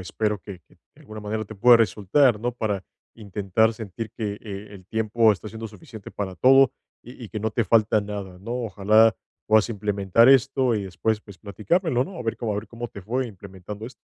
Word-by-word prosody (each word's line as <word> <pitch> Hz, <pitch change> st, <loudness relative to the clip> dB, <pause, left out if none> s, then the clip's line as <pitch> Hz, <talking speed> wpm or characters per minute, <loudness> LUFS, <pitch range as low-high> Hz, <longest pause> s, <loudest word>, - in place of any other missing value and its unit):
espero 105 Hz, +2 st, -2 dB
que 100 Hz, -2 st, -9 dB
que -, -, -24 dB
de -, -, -27 dB
alguna 110 Hz, 0 st, -9 dB
manera 110 Hz, +1 st, -3 dB
te 110 Hz, -, -10 dB
pueda 120 Hz, +4 st, +7 dB
resultar, 115 Hz, +2 st, +2 dB
¿no?, 120 Hz, +2 st, -1 dB
para 110 Hz, -5 st, -3 dB, 0.3 s
intentar 105 Hz, +1 st, 0 dB
sentir 110 Hz, 0 st, -7 dB
que, 110 Hz, -3 st, -4 dB
eh, 100 Hz, -1 st, -8 dB
el 95 Hz, -2 st, -13 dB
tiempo 110 Hz, +2 st, +2 dB
está 105 Hz, +1 st, -3 dB
siendo 110 Hz, +1 st, -7 dB
suficiente 105 Hz, 0 st, -12 dB
para 95 Hz, -2 st, -5 dB
todo, 135 Hz, +4 st, +5 dB, 0.3 s
y 125 Hz, +1 st, -13 dB
y -, -, -15 dB
que 110 Hz, -, -5 dB
no 110 Hz, +1 st, -2 dB
te 115 Hz, -, +1 dB
falta 110 Hz, -1 st, +3 dB
nada, 100 Hz, -3 st, -7 dB
¿no? 110 Hz, +5 st, -8 dB
Ojalá 110 Hz, +2 st, +4 dB, 0.3 s
puedas 110 Hz, 0 st, +4 dB
implementar 105 Hz, +1 st, +2 dB
esto 130 Hz, -1 st, +4 dB
y 105 Hz, -, -1 dB
después, 105 Hz, +4 st, -2 dB
pues, 100 Hz, -3 st, -15 dB
platicármelo, 125 Hz, -, 0 dB
¿no? 180 Hz, +5 st, -8 dB
A -, -, -5 dB
ver 115 Hz, -, -2 dB
cómo 115 Hz, -, -3 dB
a -, -, -2 dB
ver 105 Hz, +2 st, -5 dB
cómo 120 Hz, 0 st, -7 dB
te 100 Hz, -, -10 dB
fue 125 Hz, +6 st, -2 dB
implementando 100 Hz, +1 st, -9 dB
esto. 130 Hz, -, -11 dB
110 Hz, 210 wpm, -24 LUFS, 100-115 Hz, 0.3 s, pueda